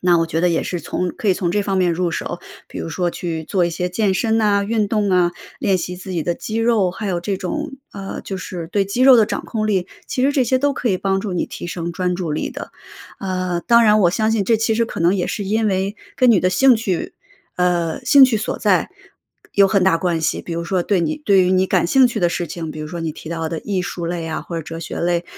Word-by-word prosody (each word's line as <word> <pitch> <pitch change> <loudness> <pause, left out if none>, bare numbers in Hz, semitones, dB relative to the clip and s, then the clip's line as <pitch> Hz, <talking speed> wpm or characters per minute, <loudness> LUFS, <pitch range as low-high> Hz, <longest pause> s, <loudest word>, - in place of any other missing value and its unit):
那 180 -1 +4
我 165 - +1
觉 165 0 -1
得 180 - +3
也 165 - +1
是 180 - -3
从 180 - -2
可 - - -7
以 190 - +4
从 175 -2 -1
这 205 +3 +1
方 195 -1 -1
面 180 -2 +2
入 175 +1 0
手。 - - -4 0.3
比 - - -8
如 80 - -4
说 175 - -1
去 165 -3 -4
做 175 +3 0
一 170 - -1
些 180 +2 -2
健 195 +1 0
身 225 +3 +1
呐、 205 -2 +2
运 215 0 0
动 205 -2 0
啊， 180 -1 +3 0.3
练 195 - +2
习 180 0 -4
自 185 +1 -8
己 165 -3 -1
的 175 +1 -2
肌 215 - -6
肉， 225 -5 +2
还 210 +2 -5
有 180 -2 0
这 195 +2 -2
种， 300 +11 -4 0.2
呃， 195 -1 -6
就 195 - -5
是 175 -2 -6
对 200 0 +1
肌 200 +6 -1
肉 260 -1 +8
的 220 -2 +4
掌 - - -4
控 215 -2 -2
力， 190 -3 0 0.2
其 255 - -2
实 275 - +4
这 275 -3 +2
些 260 +2 +2
都 285 +2 +1
可 250 - -2
以 190 - +2
帮 195 +1 0
助 195 -1 -4
你 180 - -1
提 - - -7
升 170 0 -4
专 180 +1 -1
注 175 -3 -3
力 150 - -2
的。 - - -8 0.5
呃， 185 -2 -2
当 235 0 +5
然 215 -1 +5
我 175 - +5
相 220 +3 0
信 220 -3 +1
这 225 +3 +3
其 225 +1 0
实 230 +1 +2
可 - - -7
能 170 +2 +4
也 180 - -1
是 210 - -3
因 215 +3 0
为 195 +1 -1 0.2
跟 255 -1 +4
你 215 - +5
的 185 - +2
兴 260 +5 +5
趣 195 -6 -3 0.4
呃， 175 -2 0
兴 275 +1 +8
趣 245 -4 +2
所 215 - -3
在 200 -4 +1 0.6
有 200 -1 +6
很 195 0 +2
大 180 -3 +3
关 170 -2 0
系。 155 - 0
比 170 - -7
如 170 0 -2
说 180 +1 0
对 200 -3 +1
你 310 - -1
对 195 -2 +5
于 180 - +1
你 185 0 +3
感 185 -2 +2
兴 260 +7 +5
趣 235 -3 -3
的 175 - +3
事 175 0 -3
情， 165 0 -6
比 155 - -8
如 155 - -5
说 170 +2 -6
你 165 -1 -2
提 160 - -11
到 165 -1 -3
的 165 - -4
艺 195 -3 -2
术 175 -1 -5
类 170 -1 -3
啊、 160 - -3
或 170 - -8
者 165 - -3
哲 165 +2 -7
学 165 - -6
类， 175 0 0
185 Hz, 295 characters per minute, -20 LUFS, 175-215 Hz, 0.6 s, 肉